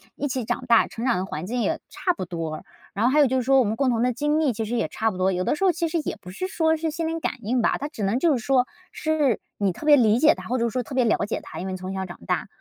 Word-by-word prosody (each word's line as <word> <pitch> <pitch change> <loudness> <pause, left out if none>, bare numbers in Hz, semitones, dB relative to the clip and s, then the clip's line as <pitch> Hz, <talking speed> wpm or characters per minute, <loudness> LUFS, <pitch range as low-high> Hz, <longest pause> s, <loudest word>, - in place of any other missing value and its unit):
一 290 - -2
起 255 -3 -2
长 245 +2 -2
大， 235 -2 +5
成 230 - -7
长 240 -6 +2
的 185 - -2
环 185 - -5
境 245 +4 -2
也 - - -1
差 360 - -1
不 330 - -5
多。 165 -3 -5 0.3
然 215 +4 0
后 255 - +4
还 300 - +4
有 285 - +6
就 260 - -1
是 250 - 0
说， 270 +1 +4
我 245 - +3
们 215 - -1
共 265 +2 +1
同 230 -1 +1
的 250 0 +2
经 295 +4 +1
历 285 -6 +2
其 220 +1 -3
实 235 +3 -2
也 160 - 0
差 220 +7 -1
不 185 - -8
多， 185 +1 +2
有 185 0 -1
的 - - +1
时 390 - 0
候 370 - +5
其 335 0 -1
实 330 - 0
也 - - -2
不 180 - -12
是 370 - -4
说 320 -3 +1
是 320 0 -2
心 325 0 -2
灵 330 0 -2
感 - - -2
应 240 +3 0
吧。 - - +2
它 290 - -4
只 225 - -8
能 200 +5 +1
就 330 0 +3
是 260 - +1
说， 260 -2 +3 0.3
是 305 -7 +1 0.2
你 195 -3 +1
特 305 - -9
别 295 -1 +7
理 225 -3 +4
解 300 +4 +6
她， - - -10
或 255 +2 0
者 235 0 +1
说 255 +2 -2
特 260 +3 -8
别 255 - +3
了 225 - +3
解 210 - -3
她， - - -8
因 190 - -4
为 185 - -3
从 185 +1 -6
小 190 0 -3
长 175 - -9
大。 - - -1
245 Hz, 360 characters per minute, -24 LUFS, 210-295 Hz, 0.3 s, 别